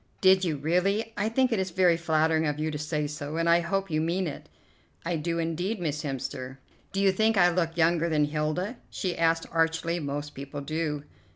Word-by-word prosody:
"Did 190 0 +5
you 160 -5 0
really? 195 +9 0
I 205 +1 0
think 255 +2 +2
it 225 - +1
is 190 0 -1
very 180 -1 +4
flattering 160 -1 +2
of 150 0 -1
you 155 +1 -1
to 150 - -3
say 150 0 -1
so, 150 +1 -5
and 165 0 +1
I 170 0 +6
hope 195 +2 -2
you 155 0 +1
mean 175 +4 0
it." 145 -4 -7 0.6
"I 170 0 0
do, 165 +2 -2
indeed, 170 +6 -2
Miss 150 -4 -2
Hemster." 135 -2 -5 0.3
"Do 195 - -2
you 195 -1 +4
think 220 +3 +2
I 175 -1 +6
look 165 -1 -1
younger 170 0 +3
than 150 -2 +3
Hilda?" 155 - -2
she 180 -2 -3
asked 165 0 +2
archly, 165 +1 +1
"most 145 0 -4
people 140 +1 -7
do." 150 0 -2
165 Hz, 205 wpm, -27 LUFS, 150-180 Hz, 0.6 s, I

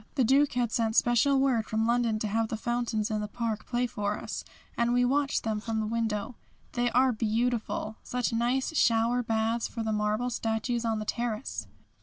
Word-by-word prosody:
The 265 - +3
Duke 275 +4 +4
had 245 -3 0
sent 225 -2 0
special 240 +4 +4
word 255 -5 +2
from 220 0 0
London 235 -1 +2
to 215 - -2
have 225 +2 0
the 220 - -3
fountains 235 -2 -1
in 215 -1 0
the 210 - -3
park 225 -1 -3
play 245 0 0
for 210 -3 -2
us, - - -5 0.3
and 235 0 +1
we 245 0 +3
watched 280 +2 +1
them 220 -1 -1
from 220 0 -2
the 215 - -1
window. 220 0 -2 0.4
They 245 0 +1
are 255 +2 +4
beautiful. 225 -1 -1
Such 250 -1 -2
nice 250 +6 0
shower 235 -1 +3
baths 225 0 0
for 230 - -5
the 220 - -1
marble 215 +4 0
statues 230 +1 -1
on 225 -1 +1
the 215 - -4
terrace! 235 +1 -3
230 Hz, 195 wpm, -29 LUFS, 220-245 Hz, 0.4 s, Duke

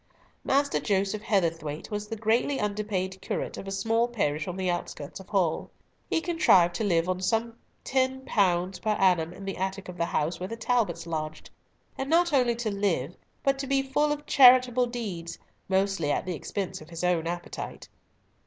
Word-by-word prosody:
Master 280 +1 +2
Joseph 200 0 0
Heatherthwayte 165 -7 -1
was 210 0 -3
the 225 - -4
greatly 225 +5 +1
underpaid 200 -3 -2
curate - - -3
of 195 - -8
a - - -4
small 225 +4 +1
parish 155 -11 -1
on 180 0 -4
the 190 -1 -1
outskirts 175 -4 -4
of 190 - -13
Hull. 180 -6 0 0.4
He 325 - +1
contrived 195 - +4
to - - -1
live 170 -4 +2
on 185 0 -1
some 225 +3 0 0.3
(pounds)10 215 -9 +1
per 220 - -1
annum 180 -5 +2
in 195 +2 -10
the 195 - -4
attic 190 0 -3
of 180 - -8
the 170 - +1
house 165 +2 -1
where 185 +1 -4
the 230 - -5
Talbots 220 -9 0
lodged,—and 160 - -7
not 340 0 +3
only 250 -4 +3
to 230 -2 -2
live, 185 -7 -1 0.3
but 275 0 +2
to 275 - -3
be 275 0 +2
full 295 +3 +1
of 295 0 -3
charitable 255 -2 +6
deeds, 200 -9 -5 0.3
mostly 190 -5 +1
at - - -1
the 185 - -2
expense 190 +3 -4
of 155 - -13
his 170 0 -6
own 175 -2 +1
appetite. 175 0 -6
195 Hz, 180 wpm, -27 LUFS, 175-240 Hz, 0.4 s, charitable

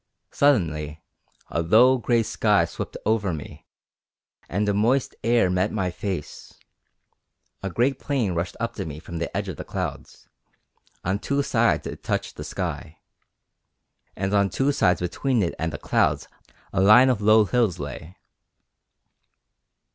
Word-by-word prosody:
Suddenly 80 - +1 0.5
a 85 - 0
low 120 +9 +5
grey 120 -1 +2
sky - - +2
swept - - -6
over 105 -3 +1
me 75 - -10 0.8
and 105 +3 -1
a 100 - +2
moist 120 +6 +1
air 115 -4 +3
met 90 0 0
my 95 -4 -1
face; 90 -4 -6 1.1
a 95 - -3
great 125 +8 0
plain 125 -10 -1
rushed 85 +2 -3
up - - -2
to - - -3
me 75 -1 -7
from 85 +1 -7
the 85 - -3
edge 100 0 -2
of 90 -6 -6
the - - -6
clouds; - - -6 0.8
on 95 +3 0
two 140 +5 0
sides - - +1
it - - -7
touched - - -3
the - - -7
sky, 80 - -5 1.2
and 95 +1 -2
on 100 -1 +3
two 135 +7 +1
sides 90 -10 +2
between 115 +6 0
it 85 - -1
and 80 0 -1
the 75 - -5
clouds - - +1 0.5
a 95 - +1
line 110 +7 +7
of 110 -5 -2
low 110 +1 +5
hills 110 -5 +1
lay. 75 +4 -7
100 Hz, 150 wpm, -24 LUFS, 85-120 Hz, 1.2 s, line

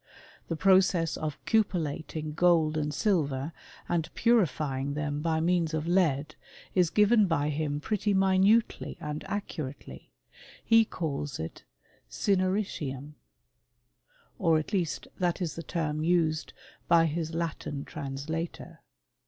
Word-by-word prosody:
The 165 - -2
process 185 -1 +3
of 150 -2 -4
cupellating 160 -7 -1
gold 165 -2 +3
and 150 -1 -1
silver, 150 -5 0 0.3
and 165 -2 -1
purifying 145 - +1
them 145 -1 -2
by 160 0 +1
means 170 -1 +1
of 155 0 -2
lead, 155 -5 +2 0.4
is 180 -3 +3
given 210 +1 +4
by 150 -3 +1
him 145 -1 -2
pretty 210 +5 -1
minutely 195 +3 +2
and 150 -2 -5
accurately: 155 -9 -6 0.5
he 225 -1 +6
calls 145 -7 -4
it 80 +1 -7 0.4
cineritiuniy 185 - -1 1.3
or 165 -1 +4
at 155 +7 -4
least 175 -6 -1
that 175 -1 0
is 170 -5 -2
the 165 - -5
term 155 -2 -2
used 160 -2 +1 0.4
by 165 -1 +5
his 160 +1 -2
Latin 155 -4 -3
translator. 155 +4 -5
160 Hz, 120 wpm, -29 LUFS, 150-185 Hz, 1.3 s, he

